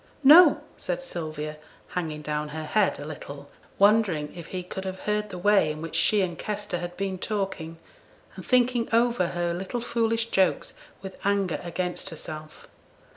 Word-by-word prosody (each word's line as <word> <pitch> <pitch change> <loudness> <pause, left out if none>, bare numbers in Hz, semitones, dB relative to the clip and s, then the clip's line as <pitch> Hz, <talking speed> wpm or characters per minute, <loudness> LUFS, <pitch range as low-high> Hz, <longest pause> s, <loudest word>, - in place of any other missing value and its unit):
'No,' 310 +4 +8 0.2
said - - -2
Sylvia, 155 - -5 0.3
hanging 155 -4 -4
down 150 0 -2
her 155 +1 -5
head 200 +6 +1
a 145 - -6
little, 145 -2 -9 0.3
wondering 200 -7 +3
if 170 -2 -8
he 185 -1 -5
could 190 +1 -6
have 190 0 -5
heard 210 0 -1
the 185 - -7
way 195 -3 +4
in 155 0 -4
which 165 0 -6
she 200 +5 +4
and 175 -2 -4
Kester 205 -4 -3
had 175 0 -6
been 190 -1 -2
talking, 190 -6 -3 0.6
and - - -8
thinking 245 -2 +2
over 235 -5 +3
her 175 0 -1
little 190 +7 -3
foolish 230 -1 0
jokes 190 -1 +1 0.3
with 190 -1 -9
anger 200 -3 +1
against 180 +2 -3
herself. 155 -2 -9
185 Hz, 165 wpm, -26 LUFS, 160-210 Hz, 0.6 s, No